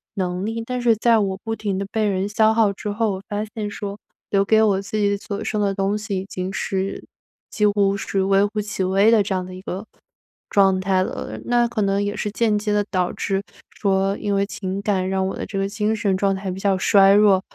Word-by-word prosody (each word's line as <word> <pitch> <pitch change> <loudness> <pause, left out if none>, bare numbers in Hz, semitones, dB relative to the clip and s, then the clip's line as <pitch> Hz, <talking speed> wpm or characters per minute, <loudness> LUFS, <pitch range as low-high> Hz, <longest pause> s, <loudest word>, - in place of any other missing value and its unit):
能 180 -1 -2
力。 225 +1 -3
但 250 +1 -3
是 235 -2 +4
在 230 +1 +3
我 195 -2 -1
不 225 -1 -2
停 205 -4 -2
地 195 - -2
被 220 -1 0
人 195 -1 0
消 220 +1 +3
耗 220 -2 +3
之 210 - -6
后， 215 +1 0
我 190 -1 -5
发 210 0 -2
现 210 -2 -3
说 205 -1 -6 0.3
留 195 -1 +3
给 220 +2 +4
我 200 -3 +2
自 200 +2 -4
己 200 -1 +1
所 200 0 -5
剩 210 - -1
的 200 -1 +1
东 195 +1 0
西 210 -2 -3
已 185 - -4
经 185 -1 -5
是， 195 0 -3 0.5
几 210 - +1
乎 200 -1 +2
是 195 -1 -1
微 195 +1 +3
乎 210 +1 -2
其 205 -2 -3
微 195 +4 +4
的 225 -2 +5
这 195 -1 -1
样 185 -1 -2
的 185 - -9
一 185 - -9
个 195 +2 -5 0.6
状 195 -2 +4
态 185 -1 +1
了。 - - -5
那 240 0 +2
可 230 -2 -2
能 200 0 +1
也 205 +1 -2
是 210 - -2
间 215 -1 +1
接 210 0 -1
地 205 0 +2
导 180 -2 0
致 195 -1 -1 0.3
说 195 -1 0
因 205 -1 -1
为 200 0 +2
情 195 -1 -4
感 190 -2 0
让 190 0 0
我 190 - -4
的 - - -5
这 200 - -6
个 195 0 0
精 215 +1 0
神 205 -3 0
状 195 0 +1
态 190 0 -4
比 185 - -6
较 195 -1 +1
衰 195 +1 +5
弱。 200 -2 +5
200 Hz, 260 characters per minute, -22 LUFS, 195-210 Hz, 0.6 s, 的